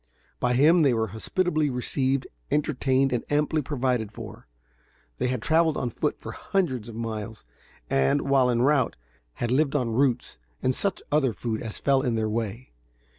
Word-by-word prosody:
By 125 Hz, 0 st, +1 dB
him 160 Hz, +6 st, +5 dB
they 135 Hz, -5 st, +4 dB
were 110 Hz, -1 st, 0 dB
hospitably 155 Hz, -, 0 dB
received, 130 Hz, +1 st, 0 dB, 0.2 s
entertained 135 Hz, -2 st, +1 dB
and 120 Hz, -, -1 dB
amply 150 Hz, +1 st, +1 dB
provided 125 Hz, -6 st, -1 dB
for. -, -, -10 dB, 0.7 s
They -, -, +1 dB
had 125 Hz, -3 st, -2 dB
traveled 160 Hz, -1 st, +3 dB
on 125 Hz, -, -2 dB
foot -, -, -2 dB
for -, -, -7 dB
hundreds 130 Hz, -, -2 dB
of 115 Hz, -, -9 dB
miles, 110 Hz, -, -5 dB, 0.4 s
and, 70 Hz, +1 st, +2 dB
while 135 Hz, -2 st, +3 dB
en 120 Hz, 0 st, +2 dB
route, 140 Hz, -1 st, +2 dB, 0.4 s
had 120 Hz, -, -3 dB
lived 145 Hz, +2 st, +2 dB
on 125 Hz, -5 st, 0 dB
roots 125 Hz, -, 0 dB, 0.2 s
and 130 Hz, -, +1 dB
such 195 Hz, +7 st, -2 dB
other 140 Hz, -5 st, +2 dB
food 110 Hz, +2 st, -3 dB
as 110 Hz, -2 st, -5 dB
fell 135 Hz, -1 st, +2 dB
in 125 Hz, -4 st, 0 dB
their 110 Hz, -1 st, 0 dB
way. 115 Hz, +2 st, -4 dB
130 Hz, 170 wpm, -26 LUFS, 115-145 Hz, 0.7 s, him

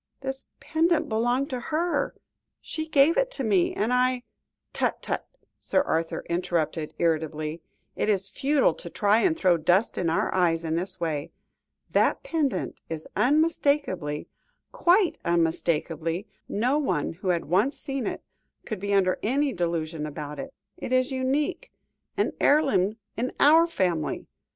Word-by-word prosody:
"This 265 Hz, 0 st, -5 dB
pendant 330 Hz, +1 st, +1 dB
belonged 240 Hz, +5 st, 0 dB
to 255 Hz, -, -2 dB
her; 325 Hz, +7 st, -1 dB, 0.4 s
she 315 Hz, 0 st, -5 dB
gave 305 Hz, +1 st, +4 dB
it -, -, +2 dB
to 270 Hz, -, -3 dB
me, 200 Hz, -6 st, +2 dB
and 220 Hz, +4 st, 0 dB
I 250 Hz, 0 st, +2 dB, 0.2 s
" -, -, -57 dB
"Tut, -, -, 0 dB
tut!" -, -, -3 dB, 0.3 s
Sir 285 Hz, -, +1 dB
Arthur 165 Hz, -, -2 dB
interrupted 170 Hz, -2 st, -1 dB
irritably; 160 Hz, -1 st, -1 dB, 0.3 s
"it -, -, 0 dB
is 195 Hz, -2 st, +1 dB
futile 275 Hz, -, +2 dB
to 170 Hz, -, -8 dB
try 205 Hz, +4 st, +3 dB
and 320 Hz, +4 st, +2 dB
throw 180 Hz, -, +3 dB
dust 180 Hz, +7 st, +2 dB
in 170 Hz, -, +1 dB
our 165 Hz, -, 0 dB
eyes 170 Hz, -3 st, +2 dB
in 160 Hz, -1 st, -2 dB
this 185 Hz, +3 st, -1 dB
way. 155 Hz, -4 st, -2 dB, 0.6 s
That -, -, +2 dB
pendant 320 Hz, -, -1 dB
is 160 Hz, -1 st, -5 dB
unmistakable 280 Hz, -, +1 dB, 0.5 s
quite 360 Hz, +1 st, +3 dB
unmistakable 165 Hz, 0 st, 0 dB, 0.3 s
no 250 Hz, +8 st, +1 dB
one 180 Hz, -, -1 dB
who 185 Hz, +3 st, -8 dB
had 175 Hz, -2 st, +1 dB
once 200 Hz, -, +1 dB
seen 270 Hz, -3 st, -3 dB
it, -, -, -4 dB, 0.4 s
could 215 Hz, -4 st, -4 dB
be 200 Hz, +1 st, 0 dB
under 185 Hz, -2 st, +2 dB
any 270 Hz, +4 st, +1 dB
delusion 165 Hz, -3 st, -2 dB
about 150 Hz, 0 st, -6 dB
it. 275 Hz, -, -6 dB, 0.3 s
It -, -, -6 dB
is 255 Hz, +1 st, +2 dB
unique 290 Hz, -, -1 dB, 0.5 s
an -, -, +1 dB
heirloom 265 Hz, -9 st, +3 dB, 0.2 s
in 245 Hz, +3 st, -2 dB
our 320 Hz, +3 st, +6 dB
family. 180 Hz, -, -1 dB
205 Hz, 150 wpm, -26 LUFS, 170-280 Hz, 0.6 s, our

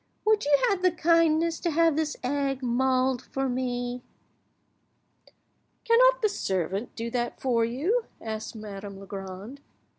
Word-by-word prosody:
Would 430 Hz, -4 st, +3 dB
you 290 Hz, -1 st, +4 dB
have 395 Hz, -5 st, +1 dB
the 370 Hz, -, +5 dB
kindness 330 Hz, -1 st, +2 dB
to 345 Hz, -, -1 dB
have 330 Hz, -1 st, +3 dB
this 310 Hz, -1 st, -1 dB
egg 275 Hz, 0 st, -1 dB
mulled 255 Hz, +1 st, +1 dB
for 270 Hz, 0 st, -3 dB
me?" 245 Hz, -1 st, -2 dB, 1.8 s
"Cannot -, -, +5 dB
your 430 Hz, -, +4 dB
servant 195 Hz, -, -2 dB
do 230 Hz, 0 st, -4 dB
that 240 Hz, 0 st, -2 dB
for 240 Hz, -3 st, +1 dB
you?" 315 Hz, -, 0 dB
asked 220 Hz, 0 st, -5 dB
Madame 200 Hz, -2 st, -8 dB
Legrand. 195 Hz, +6 st, -8 dB
260 Hz, 130 wpm, -27 LUFS, 230-330 Hz, 1.8 s, the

